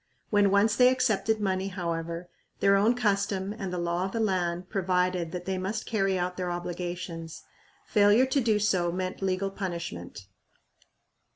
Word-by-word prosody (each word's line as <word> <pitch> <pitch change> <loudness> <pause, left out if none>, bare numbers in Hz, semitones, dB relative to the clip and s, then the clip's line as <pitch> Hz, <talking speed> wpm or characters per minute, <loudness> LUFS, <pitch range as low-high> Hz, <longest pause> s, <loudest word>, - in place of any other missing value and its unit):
When 205 -2 +4
once 205 +2 +3
they 250 0 +6
accepted 220 -4 +1
money, 190 -2 0
however, 170 -2 -4 0.3
their 195 0 +4
own 215 +5 +3
custom 200 -3 0
and 195 -4 -5
the 180 - -3
law 175 +1 -1
of 195 - -5
the 230 - -1
land 180 -4 0
provided 180 -3 0
that 180 0 -5
they 190 -1 -2
must 200 +4 -3
carry 195 -4 +1
out 180 0 -2
their 180 -1 -2
obligations. 175 -1 -5 0.4
Failure 210 +4 +5
to 265 +1 +1
do 220 -3 +2
so 185 -4 +1
meant 185 +2 -4
legal 195 +1 0
punishment. 170 - -6
190 Hz, 160 wpm, -28 LUFS, 175-205 Hz, 0.4 s, they